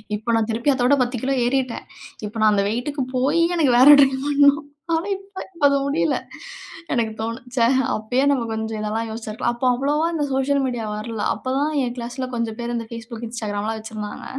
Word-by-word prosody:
இப்ப 220 +3 -2
நான் 225 -1 +1
திருப்பி 235 +6 +1
அத்தோட 260 +1 +3
10 245 0 -3
கிலோ 270 +1 +1
ஏறிட்டேன். 255 -1 -1 0.4
இப்ப 210 - -12
நான் 215 0 +5
அந்த 200 0 +2
வெயிட்டுக்கு 265 +5 -2
போய் 285 +6 +2 0.2
எனக்கு 285 -7 +3
வேற 260 - +7
ட்ரை 270 -1 +5 0.2
பண்ணணும். 285 +1 +4 0.3
ஆனா 325 +4 0
இப்ப 390 0 -9 0.2
அது 280 - +2
முடியல. 280 +4 +1 0.8
எனக்கு 225 -3 0
தோணும். 230 +2 -4
ச்ச - - 0 0.4
அப்பயே 245 +5 0
நம்ம 260 -4 0
கொஞ்சம் 220 0 -3
இதெல்லாம் 220 +2 -2
யோசிச்சிருக்கலாம். 220 +1 -3
அப்போ 240 - -3
அவ்வளவா 290 +5 0
இந்த 315 -3 -1
சோசியல் 275 +1 +1
மீடியா 245 -3 -3
வரல்ல. 215 0 -4
அப்போ 255 - -6
தான் 295 +2 0
என் 240 -1 -2
கிளாஸ்ல 245 +2 -4
கொஞ்சம் 230 -2 -3
பேர் 240 0 -3
இந்த 230 -1 -3
FaceBook, 230 0 -8
Instagram 215 -3 -4
எல்லாம் 220 +1 -2
வெச்சுருந்தாங்க. 215 -1 -7
240 Hz, 190 wpm, -22 LUFS, 225-275 Hz, 0.8 s, வேற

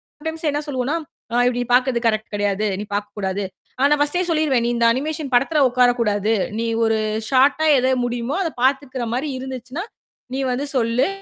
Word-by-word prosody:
Sometimes 320 +1 -7
என்ன 295 - -1
சொல்லுவோம்ன்னா, 265 +2 -1 0.4
அ - - -2
இப்படி 245 0 0
பார்க்குறது 250 -1 +3
கரெக்ட் 215 0 -1
கெடையாது. 205 0 0
நீ - - -3
பார்க்கக் 205 +1 -4
கூடாது. 195 0 -2 0.4
ஆனா 285 +1 +5
ஃபர்ஸ்ட்டே 295 +5 +1
சொல்லீருவேன், 305 -7 +2
"நீ - - +1
இந்த 235 0 +2
அனிமேஷன் 295 +1 -3
படத்துல 275 +5 +3
உட்கார 250 0 +4
கூடாது. 210 -1 +1 0.3
நீ 230 - -1 0.2
ஒரு 225 0 +2 0.3
ஷார்ட்டா 280 +4 +3
எத 255 0 +2 0.2
முடியுமோ 245 +3 -2
அதப் 320 -7 -5
பாத்துக்குற 265 -2 0
மாதிரி 275 +5 -1
இருந்துச்சுன்னா, 260 +4 -6 0.5
நீ 265 - -2
வந்து 270 +4 -2
சொல்லு 235 +1 +2
255 Hz, 170 wpm, -21 LUFS, 230-285 Hz, 0.5 s, ஆனா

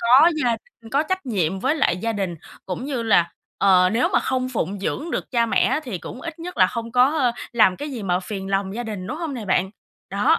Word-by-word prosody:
có 260 +8 +7
gia 240 - +3 0.3
đình, 225 - -12
có 280 +2 +3
trách 375 +1 -3
nhiệm 190 -6 0
với 270 +4 +2
lại 275 - +2
gia 225 +5 -2
đình, 195 -4 -2 0.3
cũng 190 +7 -4
như 270 -4 -2
là, 175 -7 +3 0.3
ờ, 185 -2 +5
nếu 240 +3 +2
mà - - +5
không 255 -1 -1
phụng 205 -5 -2
dưỡng 310 +10 -3
được - - -3
cha 235 -2 +2
mẹ 225 - +2
á, 270 +4 +1
thì 210 -8 -4
cũng 245 - -9
ít 330 +1 -7
nhất 355 +2 -7
là 185 - +6
không 230 +2 -5
có 255 0 +3 0.2
làm 215 -6 +4
cái 290 0 -5
gì 240 -5 -5
mà 180 -2 0
phiền 195 0 -6
lòng 195 0 0
gia 240 - -3
đình, 210 -5 -5
đúng 300 - -4
hông 320 -5 -4
nè 230 - -5
bạn? 190 -1 +1 0.4
Đó. 230 +12 +3
230 Hz, 250 wpm, -23 LUFS, 195-270 Hz, 0.4 s, có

